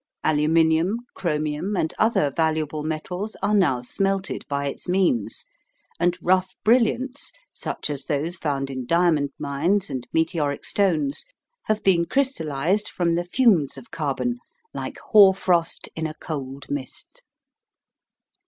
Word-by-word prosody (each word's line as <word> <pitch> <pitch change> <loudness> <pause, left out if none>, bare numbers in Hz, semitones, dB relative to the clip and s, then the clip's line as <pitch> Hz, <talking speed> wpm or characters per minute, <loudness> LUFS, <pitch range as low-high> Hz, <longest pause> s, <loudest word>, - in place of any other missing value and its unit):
Aluminium, 160 +5 +3 0.2
chromium, 155 +3 -2
and 160 - 0
other 215 -10 +3
valuable 155 -2 0
metals 180 +7 -4
are 205 +1 +2
now 165 -12 +3
smelted 195 +9 -1
by 140 0 -1
its 140 - -5
means, 180 - +1 0.5
and 175 +1 +2
rough 185 +1 +2
brilliants 250 +4 +2 0.2
such - - -4
as 140 -2 -4
those 155 +3 -1
found 140 -5 -2
in 130 -2 -5
diamond 165 -4 +3
mines 170 +8 0
and 125 -2 -4
meteoric 160 -3 0
stones 160 -8 +1 0.4
have 215 0 0
been 175 -3 +4
crystallised 190 - 0
from 170 -2 0
the 175 +1 0
fumes 180 - +3
of 130 - -12
carbon, 165 - -2 0.3
like - - -5
hoar 200 -3 +8
frost 175 -3 0
in 160 0 -2
a 155 - -8
cold 140 -4 -6
mist. 140 -2 -6
165 Hz, 130 wpm, -24 LUFS, 145-190 Hz, 0.5 s, hoar